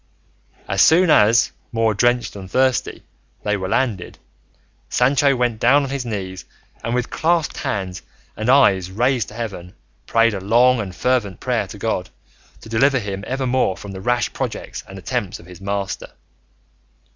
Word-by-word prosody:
As 100 0 +1
soon 170 +1 +5
as, 115 -2 +5 0.2
more 115 -2 +1
drenched 120 +1 +1
than 95 -2 -8
thirsty, 130 +5 0 0.4
they 105 0 +1
were 95 -2 -4
landed, 110 -5 -1 0.7
Sancho 135 +2 +3
went 120 -3 0
down 145 +4 +4
on 135 - -4
his 135 -3 -3
knees 95 -5 -5 0.4
and 115 - -1
with 125 -1 -2
clasped 165 -1 0
hands 95 -3 -3 0.3
and 110 +3 -2
eyes 100 -10 +4
raised 120 +3 +1
to 105 - -12
heaven, 100 -6 -6 0.3
prayed 115 -1 +3
a 100 - -3
long 120 +6 +4
and 95 -4 -5
fervent 120 -6 0
prayer - - -1
to - - -10
God - - -2 0.5
to - - -12
deliver 130 +5 +3
him 100 -4 -4
evermore 130 -6 0
from 100 - -9
the 95 -1 -7
rash 120 +2 0
projects - - -5
and - - -10
attempts - - -3
of - - -15
his 90 0 -13
master. 100 0 -3
115 Hz, 160 wpm, -20 LUFS, 100-130 Hz, 0.7 s, soon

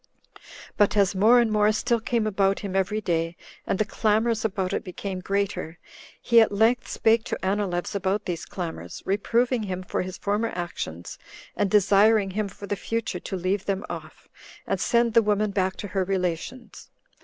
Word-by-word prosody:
But 205 0 +3
as 200 -1 +3
more 220 +6 +5
and 235 -2 +2
more 210 0 +4
still 235 +2 0
came 230 0 -1
about 195 -2 +1
him 195 -2 -5
every 200 +3 0
day, 165 -2 -1 0.3
and - - 0
the 215 - +1
clamors 220 +2 +1
about 195 -3 -1
it - - -1
became 185 +1 -5
greater, 195 -3 -2 0.4
he 235 -1 +5
at 220 - +3
length 225 +5 +2
spake 225 0 +2
to - - -3
Anileus 190 -3 -1
about 200 +1 -1
these 170 -3 -3
clamors, 175 -4 -6
reproving 235 +5 +1
him 185 -3 -4
for - - -2
his 185 0 -6
former 210 +3 -1
actions, 90 - -5 0.4
and 205 - +1
desiring 205 0 +4
him 210 +2 -1
for 200 +1 -10
the 205 - -2
future 225 -2 -3
to 190 - -5
leave 185 +2 -1
them 195 0 -1
off, - - -9 0.4
and - - -1
send 235 -1 +2
the 230 - +6
woman 210 -1 +1
back 190 -1 0
to 205 - -7
her 190 -1 0
relations. 185 +6 -4
200 Hz, 180 wpm, -25 LUFS, 185-220 Hz, 0.4 s, the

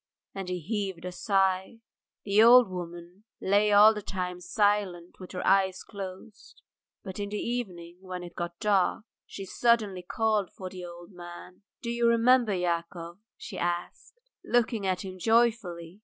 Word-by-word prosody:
And 195 -2 -5
he 180 0 -2
heaved 190 -1 -4
a 180 - -4
sigh. 190 +2 0 0.5
The 205 +1 +4
old 240 +1 +8
woman 175 +2 -8
lay 205 +2 +3
all 210 +2 +8
the 210 - -5
time 180 -2 -4
silent 205 -4 0
with 185 - -10
her 180 - -4
eyes 190 -1 +3
closed. 195 +1 -10 0.4
But 190 0 -7
in 200 0 -3
the 210 - -3
evening, 180 -8 -4
when 185 -1 -6
it 175 -1 -9
got 170 0 -5
dark, 205 0 +1 0.2
she 195 - -7
suddenly 210 -2 +1
called 215 +1 0 0.2
the 185 -1 -8
old 175 +1 -10
man. 175 +1 -11 0.2
"Do 235 - -2
you 235 0 +1
remember, 235 0 +4
Yakov," 170 0 -3 0.2
she 195 - -8
asked, 175 - -4 0.2
looking 230 -4 +1
at 185 0 -1
him 185 -1 -8
joyfully. 210 -6 +1
190 Hz, 155 wpm, -28 LUFS, 180-215 Hz, 0.5 s, old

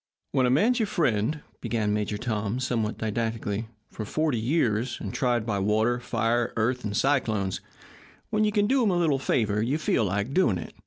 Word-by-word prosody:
"When 130 -3 +3
a - - +2
man's 220 - +3
your 220 - +1
friend," 145 - 0 0.2
began 105 -3 0
Major 105 0 -1
Tom, 110 0 -2
somewhat 115 -4 -1
didactically, 110 -1 -2 0.2
"for 110 - -5
forty 150 +2 0
years, 120 -2 0
and 100 - -5
tried 120 -4 +1
by 105 -3 -1
water, 110 +5 +2
fire, 120 0 0
earth, 125 +3 0
and 105 -1 -2
cyclones, 110 -9 +1 0.7
when 215 0 +2
you 210 - +2
can 205 -1 +2
do 265 +4 +3
him 225 - +3
a 180 - +1
little 155 -6 +2
favour 105 -5 +1
you 130 +7 0
feel 145 -7 +1
like 100 +6 -1
doing 130 - +3
it." 80 - -8
115 Hz, 190 wpm, -26 LUFS, 105-140 Hz, 0.7 s, When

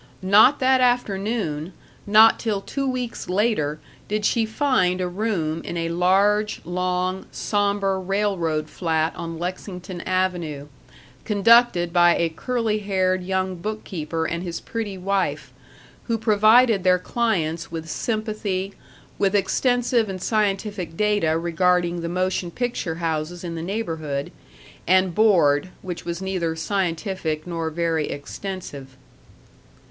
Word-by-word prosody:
Not 210 +9 +6
that 260 0 +3
afternoon, 200 -8 0 0.3
not 215 +2 +6
till 215 -4 -1
two 275 +6 -3
weeks 250 -6 -4
later, 180 -7 0 0.3
did 210 0 -1
she 225 -1 +2
find 220 -7 +1
a 180 - -1
room 175 -5 -2
in 170 - -5
a 165 0 -1
large, 195 +5 +2
long, 180 +1 -2
somber 200 -2 0
railroad 185 -5 -1
flat 160 -2 -1
on 165 -1 -6
Lexington 180 +1 -6
Avenue, 175 -6 -2 0.5
conducted 210 -4 +4
by 175 -1 +5
a 170 - +1
curly 225 +4 -1
haired 185 -2 0
young 190 0 -1
bookkeeper 170 -5 -4
and 170 +1 -2
his 175 -2 -4
pretty 215 -4 -5
wife, 195 +1 -2 0.5
who 230 -1 0
provided 220 0 +4
their 185 -1 +5
clients 175 -7 -1
with 165 -1 -5
sympathy, 200 - -2 0.5
with 200 0 +2
extensive 235 +3 +1
and 190 -1 -5
scientific 200 -4 -1
data 205 -7 +2
regarding 175 +1 +1
the 170 - -3
motion 185 0 -1
picture 235 -5 -3
houses 165 +1 -3
in 170 -1 -4
the 165 - -5
neighborhood, 160 -7 -3 0.6
and 185 0 +3
board 175 -7 +3
which 175 -2 -6
was 170 +2 -4
neither 180 -4 -2
scientific 170 -2 -2
nor 165 -2 -3
very 165 -1 -1
extensive. 145 -3 -7
185 Hz, 125 wpm, -23 LUFS, 170-210 Hz, 0.6 s, Not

